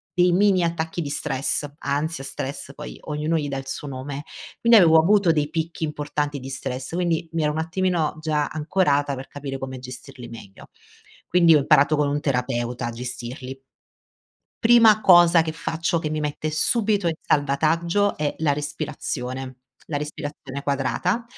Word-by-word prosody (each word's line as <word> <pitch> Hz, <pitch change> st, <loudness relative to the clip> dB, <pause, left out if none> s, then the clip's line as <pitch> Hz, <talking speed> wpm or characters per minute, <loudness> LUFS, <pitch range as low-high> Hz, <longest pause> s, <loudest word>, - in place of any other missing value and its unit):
dei 180 Hz, 0 st, +4 dB
mini 190 Hz, 0 st, +3 dB
attacchi 165 Hz, 0 st, -2 dB
di 145 Hz, -, -4 dB
stress, 140 Hz, +1 st, -1 dB
ansia, 145 Hz, +2 st, -2 dB
stress 140 Hz, 0 st, -6 dB
poi 150 Hz, -, -8 dB
ognuno 150 Hz, +2 st, -1 dB
gli 150 Hz, -, -2 dB
dà 135 Hz, -1 st, -3 dB
il 135 Hz, -, -6 dB
suo 145 Hz, +2 st, -5 dB
nome 140 Hz, +2 st, -6 dB, 0.4 s
quindi 235 Hz, -1 st, +7 dB
avevo 165 Hz, -4 st, +7 dB
avuto 195 Hz, 0 st, +4 dB
dei 150 Hz, -2 st, 0 dB
picchi 165 Hz, 0 st, -3 dB
importanti 145 Hz, -1 st, -2 dB
di 130 Hz, +1 st, -8 dB
stress, 130 Hz, +1 st, -5 dB
quindi, 170 Hz, -2 st, 0 dB
mi 165 Hz, -, 0 dB
ero 150 Hz, -, +2 dB
un 150 Hz, -, -4 dB
attimino 165 Hz, -1 st, -1 dB
già 150 Hz, -2 st, 0 dB
ancorata 150 Hz, -3 st, 0 dB
per 130 Hz, +1 st, -8 dB
capire 140 Hz, -1 st, -6 dB
come 130 Hz, -1 st, -6 dB
gestirli 125 Hz, -1 st, -10 dB
meglio. 115 Hz, -4 st, -12 dB, 0.6 s
Quindi 170 Hz, -2 st, +5 dB
ho -, -, +7 dB
imparato 140 Hz, +2 st, +4 dB
con 145 Hz, -1 st, +2 dB
un 145 Hz, -, 0 dB
terapeuta 125 Hz, -2 st, -1 dB
a 120 Hz, -, -3 dB
gestirli. 125 Hz, +2 st, -7 dB, 1.0 s
Prima 225 Hz, -2 st, +6 dB
cosa 175 Hz, -3 st, +7 dB
che 160 Hz, -1 st, -4 dB
faccio 165 Hz, +1 st, -2 dB
che 155 Hz, -2 st, -3 dB
mi 155 Hz, 0 st, -2 dB
mette 150 Hz, +1 st, -3 dB
subito 205 Hz, +2 st, +1 dB
in 160 Hz, -, -1 dB
salvataggio 165 Hz, +7 st, +1 dB
è 150 Hz, -1 st, -1 dB
la 150 Hz, -3 st, +2 dB
respirazione. 135 Hz, -3 st, -4 dB, 0.3 s
La 150 Hz, -, -3 dB
respirazione 145 Hz, -2 st, -6 dB
quadrata, 140 Hz, -, -1 dB
150 Hz, 165 wpm, -23 LUFS, 135-165 Hz, 1.0 s, quindi